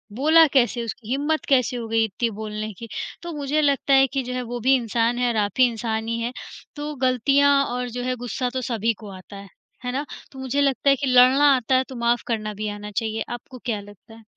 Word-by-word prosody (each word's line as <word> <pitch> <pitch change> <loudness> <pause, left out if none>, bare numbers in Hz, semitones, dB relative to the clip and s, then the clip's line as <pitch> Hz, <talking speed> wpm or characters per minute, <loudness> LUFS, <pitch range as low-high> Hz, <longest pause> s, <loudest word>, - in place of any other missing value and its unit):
बोला 315 +6 +6
कैसे? 240 -2 +2
उसकी 230 0 -7
हिम्मत 290 +4 0
कैसे 255 -2 +2
हो 230 -1 -5
गई 225 0 +2
इतनी 220 +3 -2
बोलने 215 0 -4
की?" 230 +5 -10 0.4
तो 345 - -5
मुझे 290 +2 0
लगता 280 -1 +2
है 270 0 +6
कि 270 0 -2
जो 250 0 -5
है, 250 - -2
वो 245 0 -5
भी 260 +4 +4
इंसान 235 -1 0
है 250 - +2
और 235 - -2
आप 205 -1 +1
भी 255 - +7
इंसान 225 -1 -3
ही 230 0 -1
हैं, 235 +2 -3 0.4
तो 295 0 -5
गलतियाँ 275 +3 +3
और 250 0 -3
जो 245 +1 -5
है 255 0 -1
गुस्सा 245 +1 -3
तो 260 - -2
सभी 230 -2 0
को 215 -2 -10
आता 185 +2 -12
है, 200 0 -10 0.4
है 250 - -1
ना? 275 +4 -2 0.3
तो 265 - -11
मुझे 265 +2 -1
लगता 280 0 +2
है 275 - +6
कि 275 +1 -3
लड़ना 260 +3 +6
आता 255 +1 0
है 260 - +3
तो 260 - -8
माफ़ 235 0 +1
करना 215 -2 -2
भी 210 +1 -4
आना 205 0 -7
चाहिए, 220 0 -2
आपको 240 +2 -8
क्या 225 -4 -1
लगता 205 +2 -16
है? 225 - -16
245 Hz, 240 wpm, -23 LUFS, 225-270 Hz, 0.4 s, भी